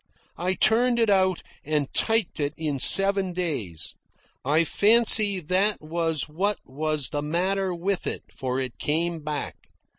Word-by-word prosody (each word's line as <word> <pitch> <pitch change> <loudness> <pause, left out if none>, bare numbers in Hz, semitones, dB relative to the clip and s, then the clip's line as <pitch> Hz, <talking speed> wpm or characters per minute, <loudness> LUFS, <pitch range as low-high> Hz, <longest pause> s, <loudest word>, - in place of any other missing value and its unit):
I 185 +2 -1
turned 235 +6 +3
it 225 -3 +2
out 185 -2 +1 0.2
and 150 -2 -2
typed 225 -7 0
it 145 +1 -2
in 150 -4 -3
seven 195 +3 +5
days. 110 - -4 0.5
I 150 +5 +2
fancy 210 +1 +4
that 190 +6 0
was 160 -2 -2
what 190 +7 -1
was 150 -1 -2
the 145 - -3
matter 185 +5 -1
with 185 +2 -2
it, - - -4
for 130 0 -3
it 130 -3 -6
came 165 +2 -1
back. 150 -1 -5
170 Hz, 145 wpm, -24 LUFS, 150-195 Hz, 0.5 s, seven